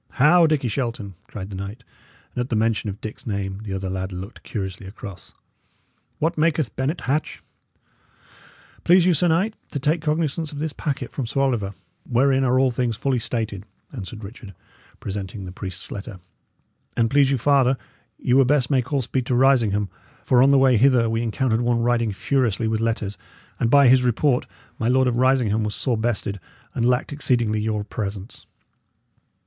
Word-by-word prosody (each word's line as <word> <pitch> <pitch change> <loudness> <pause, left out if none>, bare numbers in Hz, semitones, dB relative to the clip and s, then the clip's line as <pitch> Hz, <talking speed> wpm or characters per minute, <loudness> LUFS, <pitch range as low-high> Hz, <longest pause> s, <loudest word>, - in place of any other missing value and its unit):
"How! 165 +5 +5
Dickie 150 -5 +1
Shelton!" 115 -4 -3
cried 100 -1 -7
the - - -6
knight; 100 +6 -7 0.5
and 125 - -2
at 125 - -4
the 115 - 0
mention 110 -1 +1
of 100 +1 -6
Dick's 110 - -8
name 100 -1 -3
the 100 -3 -5
other 95 0 -3
lad 95 0 -3
looked 95 +5 -8
curiously 95 -3 -5
across. 100 -3 -10 0.8
"What 160 +1 -1
maketh 155 -5 +1
Bennet 140 +6 -2
Hatch?" 145 +4 -2 1.4
"Please 180 0 +5
you, 180 - +4
sir 170 +3 +2
knight, 185 +7 +2 0.2
to - - -4
take 150 +4 +1
cognisance 155 0 -1
of 145 - -8
this 155 0 -2
packet 145 -4 -3
from 130 -5 -4
Sir 135 - -2
Oliver, 110 -8 0 0.3
wherein 135 +2 +3
are 130 0 +2
all 130 -1 +3
things 120 -2 -1
fully 135 -3 0
stated," 110 -4 -3 0.3
answered 110 -2 -7
Richard, 100 -1 -10 0.4
presenting 100 0 -5
the 90 - -7
priest's 95 -1 -7
letter. 100 -1 -7 0.8
"And 115 -1 +3
please 140 +2 +4
you 135 - +2
farther, 135 0 +3 0.4
ye 125 - 0
were 135 +1 +6
best 130 -1 +2
make 130 -1 +1
all 140 -3 +1
speed 125 +1 -2
to 125 - +1
Risingham; 115 -6 +3 0.4
for 125 -1 +4
on 135 - +6
the 140 - +5
way 130 -2 +5
hither 120 -1 +4
we 115 0 0
encountered 120 0 0
one 120 -1 +1
riding 120 -2 +1
furiously 115 0 0
with 110 0 0
letters, 110 -3 -2 0.4
and 115 - +1
by 140 +1 +6
his 130 +1 +6
report, 125 +2 +1 0.3
my 115 - 0
Lord 130 +1 +3
of 120 -1 0
Risingham 125 -4 +2
was 105 0 -2
sore 125 -4 0
bested, 110 -3 -1 0.3
and 120 -1 +1
lacked 125 +3 0
exceedingly 120 -6 +1
your 105 -1 -1
presence." 100 0 -6
120 Hz, 180 wpm, -23 LUFS, 105-135 Hz, 1.4 s, were